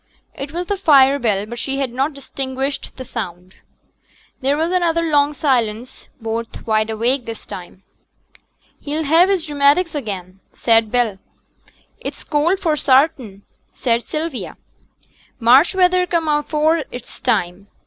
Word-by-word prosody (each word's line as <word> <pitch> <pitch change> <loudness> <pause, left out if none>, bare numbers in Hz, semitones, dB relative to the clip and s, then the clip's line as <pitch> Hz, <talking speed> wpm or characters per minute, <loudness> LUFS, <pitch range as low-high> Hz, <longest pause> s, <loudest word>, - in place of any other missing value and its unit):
It 275 +1 -7
was 350 +2 -3
the 405 +3 -2
fire 280 -6 +5
bell, 210 -5 0
but 240 +2 -7
she 270 +2 -2
had 270 -3 -2
not 270 +4 0
distinguished 270 0 -4
the 260 - -7
sound. 185 -6 -7 0.9
There 275 +2 +1
was 325 +3 0
another 335 -2 +1
long 295 -2 +2
silence; 245 -5 -1
both 225 0 -5
wide 215 0 +1
awake 235 +4 0
this 225 -1 -7
time. 180 +1 -10 1.0
'He'll 300 +2 -3
have 325 +5 +4
his 365 -5 0
rheumatics 290 +4 +2
again,' 195 - -6
said 225 -2 +2
Bell. 235 -6 0 0.8
'It's - - -7
cold 325 +6 +1
for 325 -5 +1
sartin,' 260 -8 +2 0.3
said 235 -2 +1
Sylvia. 305 0 -5 0.8
'March 260 +10 +5
weather 365 -1 +3
come 335 -3 0
afore 305 +2 +1
its 245 0 -10
time. 180 +3 -1
275 Hz, 140 wpm, -19 LUFS, 230-315 Hz, 1.0 s, fire